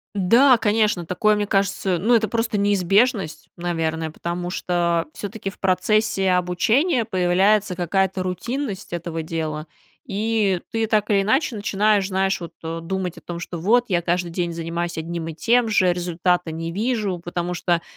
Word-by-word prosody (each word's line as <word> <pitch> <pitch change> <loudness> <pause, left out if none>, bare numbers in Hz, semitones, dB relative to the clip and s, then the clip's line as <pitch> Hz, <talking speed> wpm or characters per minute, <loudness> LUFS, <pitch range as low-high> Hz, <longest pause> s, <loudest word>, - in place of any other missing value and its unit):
Да, 235 +7 +5
конечно, 210 -5 +1
такое, 210 +5 +2
мне 205 0 -1
кажется, 195 -2 0
ну, 215 +8 +2
это 225 -2 +3
просто 225 -2 -1
неизбежность, 200 - +1
наверное, 165 -2 -2
потому 175 +2 -4
что 170 -2 0
всё-таки 205 -1 -5
в 195 - -14
процессе 190 +1 +1
обучения 225 - +2
появляется 190 +1 +2
какая-то 190 +2 0
рутинность 200 +3 -4
этого 165 -1 -4
дела. 155 -1 -4 0.4
И 210 -4 0
ты 225 0 0
так 215 -1 +1
или 200 -1 +3
иначе 245 +4 +1
начинаешь, 205 -1 +1
знаешь, 190 +1 0
вот, 170 -1 -7
э, 165 +1 -4
думать 185 0 -3
о - - -11
том, 175 -1 -6
что 175 0 -6
вот 230 +9 +3
я 175 -3 0
каждый 175 0 0
день 175 -1 -2
занимаюсь 170 +1 -3
одним 165 0 -4
и - - -5
тем 235 +8 +2
же, 185 -4 +3
результата 175 -1 0
не 165 +1 -4
вижу. 215 -3 -1
Потому 175 +1 -3
что 175 -1 0
185 Hz, 160 wpm, -22 LUFS, 175-215 Hz, 0.4 s, Да